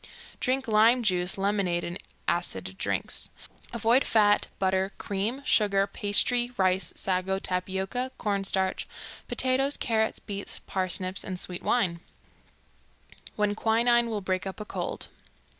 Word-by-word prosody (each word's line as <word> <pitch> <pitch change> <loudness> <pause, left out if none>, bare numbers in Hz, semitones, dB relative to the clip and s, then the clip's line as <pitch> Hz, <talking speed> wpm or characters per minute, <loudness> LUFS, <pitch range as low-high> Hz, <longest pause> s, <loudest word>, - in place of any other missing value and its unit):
Drink 260 0 0
lime 225 +3 +5
juice, 180 -3 +1
lemonade, 195 -3 0
and 175 +2 -5 0.3
acid - - -1
drinks. - - -2 0.4
Avoid 235 +3 +3
fat, 210 -2 +3
butter, 190 +1 0
cream, 215 +8 -2
sugar, 200 -5 +3
pastry, 240 +5 +3
rice, 185 -2 +2
sago, 190 0 0
tapioca, 190 +7 -2
corn 200 -2 -1
starch, 190 -1 -1 0.4
potatoes, 265 +2 +1
carrots, 220 -2 0
beets, 200 -1 -5
parsnips, 185 0 -2
and 185 -2 -5
sweet 180 -1 -3
wines. 180 -9 +1 1.4
When 210 -1 +1
Quinine 235 +2 +3
Will 215 -2 -2
Break 185 0 -2
Up 190 - -6
a 210 - -5
Cold. - - -5
200 Hz, 125 wpm, -27 LUFS, 190-230 Hz, 1.4 s, lime